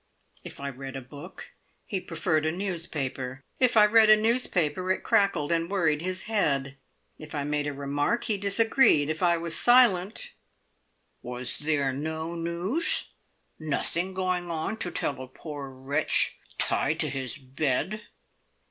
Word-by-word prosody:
If - - -10
I 140 0 -4
read 135 0 -8
a 135 - -5
book, 140 +3 -11 0.3
he 190 -3 -3
preferred 165 -2 0
a - - +1
newspaper. 150 -8 -4 0.2
If 250 -3 +3
I 210 - +8
read 220 0 +5
a 215 - +8
newspaper, 185 -7 0
it 190 - -1
crackled, 175 -7 +2
and 165 0 0
worried 165 -6 +1
his 185 +1 -4
head. 140 -11 -1 0.4
If 155 0 -9
I 145 - -2
made 150 0 -1
a - - -1
remark, 145 +11 -1
he 220 -3 0
disagreed; 200 - +3
if 160 - -5
I 170 -1 +3
was 165 0 -3
silent, 225 -6 +3 0.9
"Was 125 0 -1
there 145 -3 +1
no 160 +4 -4
news? 180 - +2 0.5
nothing 170 +4 -2
going 185 -2 -1
on 165 +6 -3
to 180 - 0
tell 140 -5 -1
a 130 - -8
poor 145 +1 -8
wretch 135 +3 0 0.2
tied - - +1
to - - +1
his 135 -1 -3
bed?" 145 +9 -2
165 Hz, 150 wpm, -27 LUFS, 140-190 Hz, 0.9 s, I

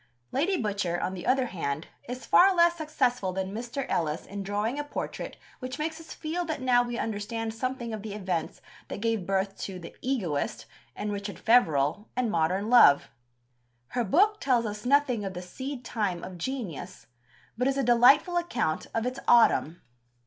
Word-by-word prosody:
Lady 350 +8 +1
Butcher, 200 -5 -1
on 185 - -2
the 180 - -6
other 260 0 +3
hand, 160 - -3 0.2
is 250 +1 -6
far 380 +1 +6
less 340 0 +5
successful 255 - -1
than 190 +1 -3
Mr. 245 +4 -4
Ellis 155 -1 -1
in 200 +1 -6
drawing 205 +7 -2
a - - -1
portrait 290 - -5 0.2
which 255 -1 -5
makes 320 +1 -3
us 330 - -12
feel 335 +3 -3
that 315 -3 -3
now 250 -2 +4
we 240 -1 -3
understand 225 +1 -3
something 245 0 -3
of 215 - -4
the 210 -1 -6
events 185 -5 -3 0.3
that - - -6
gave 225 -4 -1
birth 195 0 0
to 190 -2 -5
The 170 -2 -10
Egoist 195 - -2 0.3
and 210 - -3
Richard 200 0 -5
Feverel 170 - +3
and 245 -3 0
Modern 180 +5 +1
Love. 230 -12 +6 0.8
Her 245 - -1
book 405 - +3
tells 245 -4 +2
us 210 +2 -5
nothing 270 -5 +3
of 190 -2 -5
the 180 - -4
seed 260 +7 -7
time 195 -6 -2
of 180 -2 -8
genius, 190 - -5 0.5
but 250 +3 0
is 275 0 +1
a 275 - +1
delightful 250 +9 +5
account 250 - -1
of 225 +1 0
its 255 +1 -3
autumn. 225 -8 +4
230 Hz, 180 wpm, -28 LUFS, 190-260 Hz, 0.8 s, far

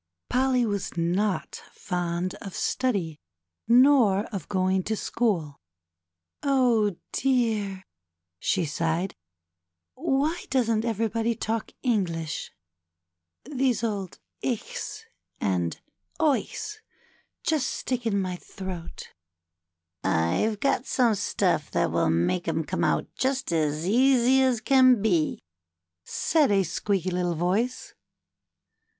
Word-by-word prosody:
Polly 255 -1 +2
was 200 -4 -3
not 185 +4 -1
fond 175 -1 -2
of 195 - -7
study 195 - -1 0.5
nor 240 -5 +5
of 190 -6 -5
going 190 -1 +1
to 220 - 0
school. 180 -11 -1 0.8
Oh, 245 -8 +2 0.2
dear," 220 -7 0 0.6
she 185 -4 +1
sighed, 165 +4 -1 0.8
^^why 300 +3 -1
doesn't 230 -4 +1
everybody 225 +1 0
talk 220 +1 -3
English! 175 - -1 0.9
These 260 -4 0
old 200 -5 -3 0.3
Ichs 450 - -4 0.4
and 90 -4 -1 0.4
Eiiclis 325 +8 0 0.7
just 310 -5 +1
stick 245 -2 -3
in 200 -3 +1
my 185 -2 -2
throat! 185 -2 -8 0.6
'' 85 0 -57
I've 140 - +1
got 275 0 +1
some 240 -4 +3
stuff 200 - 0
that - - 0
will - - +2
make 85 - +1
'em 160 0 0
come - - -2
out - - +2
just 265 -5 -1
as 155 -1 0
easy 260 +3 +4
as 255 -4 +2
can 255 -2 +5
be," 180 -7 +1 0.6
said 305 - +2
a 205 - +3
little 195 - +3
squeaky 190 -3 -1 0.2
voice. 200 +10 -1
210 Hz, 110 wpm, -26 LUFS, 180-255 Hz, 0.9 s, nor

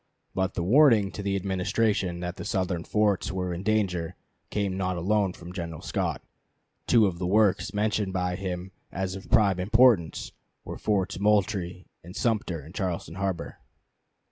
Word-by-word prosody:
But 95 -1 -1
the 85 - -1
warning 115 - +5
to - - -6
the 100 -1 -1
Administration 95 -1 0
that 90 +1 -4
the - - -6
Southern 90 -4 -1
forts 105 -2 +1
were 90 -1 -2
in 85 - -5
danger 95 -5 0 0.3
came 100 -3 -1
not 95 -1 -1
alone 100 +2 +1
from 85 0 -10
General 85 -3 -6
Scott. - - -2 0.6
Two 115 -3 +5
of 90 -3 -2
the 90 - -1
works 105 0 +3
mentioned 105 -1 0
by 90 -1 -1
him 95 0 -5 0.2
as 95 0 -3
of 95 0 -9
prime 100 -4 +4
importance 110 -3 +3 0.3
were - - -7
Forts 95 -3 0
Moultrie 100 -3 +1 0.2
and 90 +3 -11
Sumter 105 - -1
in 80 - -12
Charleston 90 -6 -3
harbor. 95 -2 -3
95 Hz, 160 wpm, -27 LUFS, 90-105 Hz, 0.6 s, warning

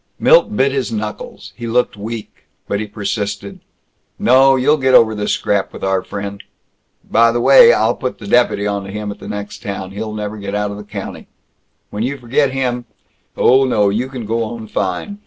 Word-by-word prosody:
Milt - - +4
bit 135 +1 +3
his 135 -3 -2
knuckles. 105 -1 -6
He 120 -1 -6
looked 125 +1 +1
weak. 110 +2 -8 0.2
But 100 - -1
he 110 - -4
persisted, 100 -1 -4 0.6
"No, 135 +2 +5
you'll 140 +4 +3
get 130 -2 +3
over 110 -1 +6
this 105 -1 -1
scrap 100 -2 -1
with - - -10
our 95 -1 +1
friend. 100 +1 -6 0.7
By 115 +1 +4
the 120 - -1
way, 475 - +8
I'll - - +2
put 130 -3 -4
the 105 - -11
deputy 105 -2 +2
onto 100 -1 -3
him, 105 0 -4
in - - -10
the - - -10
next 105 0 -6
town. 100 -4 -5
He'll 105 +2 -5
never 105 0 -5
get 100 0 -5
out 105 0 -1
of 100 - -7
the 105 - -8
county. 105 - -8 0.6
When 105 - -4
you 135 +4 -2
forget 135 +3 +1
him 125 -2 -2 0.5
Oh 130 +2 +5
no, 105 -6 +2
you 115 +6 -1
can 125 -4 -6
go 115 +2 -1
on 115 0 -6
fine. 100 - -3
110 Hz, 195 wpm, -17 LUFS, 100-125 Hz, 0.7 s, way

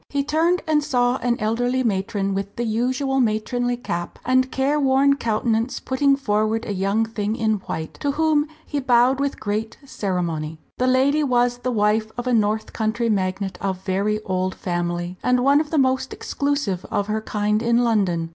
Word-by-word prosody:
He 280 -1 0
turned 330 +5 +1
and 305 -2 +2
saw 245 -2 +1
an 240 -2 -1
elderly 245 +4 0
matron 195 -2 -1
with 195 +1 -4
the 240 - -2
usual 255 +4 0
matronly 245 +2 0
cap 175 -7 -4
and 255 +1 +2
careworn 275 0 +3
countenance 230 0 0
putting 275 +1 +2
forward 220 -3 0
a 205 - -3
young 200 +4 +1
thing 215 -1 -2
in 220 -2 +1
white, 160 0 -5
to 285 -1 0
whom 310 -1 +2 0.2
he 290 - -2
bowed 255 0 +3
with 280 0 -1
great 215 +1 -3
ceremony. 170 - -3 0.2
The 255 - +2
lady 270 +4 +3
was 245 -2 +1
the 255 - -2
wife 215 0 +1
of 245 - -3
a 250 - +1
north 215 -1 +1
country 225 +1 0
magnate 190 -1 -2
of 190 -1 -3
very 205 +2 0
old 185 -1 -1
family, 175 0 -3
and 250 0 +3
one 280 +2 +5
of 310 - -5
the 320 - -1
most 260 -1 +1
exclusive 280 -11 -2
of 205 -2 0
her 215 +1 -2
kind 210 0 0
in 235 +1 +2
London. 190 -8 +1
230 Hz, 175 wpm, -22 LUFS, 205-260 Hz, 0.2 s, one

